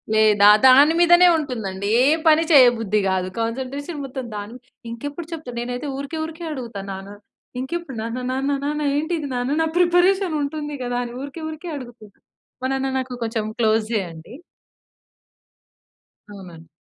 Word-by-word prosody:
లేదా, 210 -2 +5 0.2
దాని 280 +5 +7
మీదనే 345 +1 +6
ఉంటుందండి. 205 -9 -4
ఏ - - +5 0.2
పని 315 +1 +5
చేయ 265 -4 +8
బుద్ధి 210 -1 0
గాదు. 185 -1 0
కాన్‌సన్ట్రే‌షన్ 265 +6 -4
మొత్తం 260 -1 -6
దాని 205 +3 -7 0.3
ఇంకెప్పుడు 290 +7 -6
చెప్తా 310 -6 -6
నేనైతే 245 +4 -4
ఊరికే, 280 +4 -5
ఊరికే 325 +1 -8
అడుగుతాను 230 -8 -6
నాన్న 195 +2 -9 0.4
ఇంకెప్పుడు 275 0 -5
నాన్న, 230 +2 -4
నాన్న, 270 +2 -1
నాన్న 300 +1 -2
ఏంటిది 315 0 -2
నాన్న 245 +3 -2
నా 320 - +2
ప్రిపరేషన్ 360 +1 +3
ఉంటుంది 295 +1 -4
గదా! 245 0 -2
అని 240 0 -7
ఊరికే, 285 +4 -8
ఊరికే 315 +3 -8
అడుగుతున్నా. 240 -5 -12 0.5
మా - - +1
నాన్న 270 0 -1
నాకు 255 -1 -5
కొంచెం 225 -1 -2
క్లోజే 220 0 +1
అండి. 160 +6 -12 1.9
అవునండి. 180 -5 -12
260 Hz, 145 wpm, -22 LUFS, 220-305 Hz, 1.9 s, చేయ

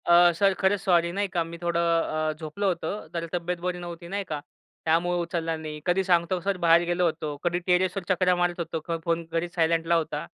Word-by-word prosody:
अ, 175 0 +7
sir 195 +3 +3
खरंच 190 +1 +2
sorry 170 -3 +3
नाही 200 +3 -1
का, 175 -3 -1
मी 165 +1 -8
थोडं 170 -1 0
अ, 165 -2 +1
झोपलं 160 +6 -4
होतं, 190 +3 -2
तर 170 -1 -2
तब्येत 175 0 -1
बरी 180 -1 -1
नव्हती 170 -1 -8
नाही 200 +3 -3
का, 150 -2 -3 0.5
त्यामुळे 175 +2 +2
उचलला 165 -1 -2
नाही. 155 -1 -6
कधी 185 +2 +2
सांगतो 180 0 +2
सर 195 +1 -1
बाहेर 170 -1 +5
गेलो 175 +1 +1
होतो, 155 -3 -2
कधी 175 0 +1
टेरेसवर 185 +1 +2
चकरा 185 -1 +3
मारत 175 0 0
होतो, 165 0 -3
फोन 165 0 0
घरीच 170 +1 -2
सायलेंटला 165 0 +2
होता. 155 -2 -1
170 Hz, 200 wpm, -26 LUFS, 165-180 Hz, 0.5 s, अ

